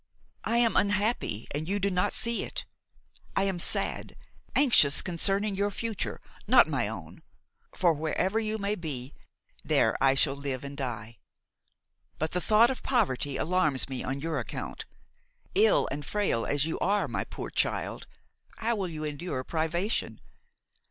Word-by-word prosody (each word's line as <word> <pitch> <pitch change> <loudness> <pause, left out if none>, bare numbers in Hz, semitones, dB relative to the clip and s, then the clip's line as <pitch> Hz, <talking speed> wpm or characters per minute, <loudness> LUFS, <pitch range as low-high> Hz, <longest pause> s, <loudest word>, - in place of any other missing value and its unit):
I 230 +2 +1
am 235 -1 +3
unhappy 205 - +1
and 155 +4 -3
you 200 - +1
do 200 0 0
not 180 0 +1
see 235 0 0
it. - - -4 0.7
I 195 - +2
am 190 -3 -1
sad, - - 0 0.4
anxious 225 - +6
concerning 195 +3 0
your 200 +1 +1
future, 220 +1 -3 0.3
not - - +7
my - - 0
own; - - -8 0.5
for, 175 -3 +3
wherever 160 +7 0
you 220 0 -2
may 200 0 -1
be, 145 -8 -5 0.5
there - - +3
I 135 0 +5
shall 135 0 +3
live 140 -2 -4
and 140 0 -7
die. 115 -5 -5 1.0
But 160 +1 -2
the 180 - 0
thought 220 +5 +5
of 260 - -5
poverty 145 - 0
alarms 155 -6 +2
me 130 -2 -3
on 135 +1 -3
your 165 +1 -1
account; - - -5 0.7
ill 425 +4 +4
and 145 +1 -4
frail 190 - 0
as 145 0 +1
you 165 - -3
are, 205 +1 +1
my - - -2
poor - - -7
child, - - -1 0.5
how 230 0 0
will 190 -3 -2
you 155 -2 -6
endure 150 -2 -3
privation? 170 - -1
175 Hz, 155 wpm, -28 LUFS, 140-210 Hz, 1.0 s, not